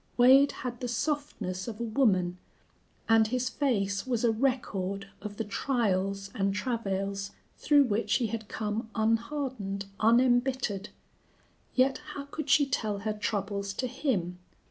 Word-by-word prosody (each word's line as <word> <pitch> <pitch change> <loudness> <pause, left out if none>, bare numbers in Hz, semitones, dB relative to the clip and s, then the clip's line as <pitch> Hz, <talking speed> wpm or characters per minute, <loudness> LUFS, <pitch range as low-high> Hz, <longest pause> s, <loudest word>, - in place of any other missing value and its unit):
Wade 265 +3 +7
had 245 -2 -4
the 250 - -3
softness 240 - -2
of 225 -2 -6
a - - -2
woman, 195 -7 +2 0.7
and 225 -1 +5
his 250 +2 -1
face 200 -8 0
was 245 -3 0
a 235 - +4
record 200 -6 -1
of 205 0 -7
the 225 - -1
trials 195 -4 -1
and 195 0 0
travails 200 -4 -2 0.3
through 290 -1 +5
which 225 -3 0
he 250 - +2
had 220 -1 -4
come 215 +2 -3
unhardened, 225 -3 -1
unembittered. 245 -2 +2 0.9
Yet 260 +1 +3 0.2
how 280 - -5
could 290 +1 -6
she 285 +1 +6
tell 215 -6 -2
her 215 - +1
troubles 200 -1 -2
to 255 - -2
him? 185 - -2
225 Hz, 140 wpm, -29 LUFS, 200-255 Hz, 0.9 s, Wade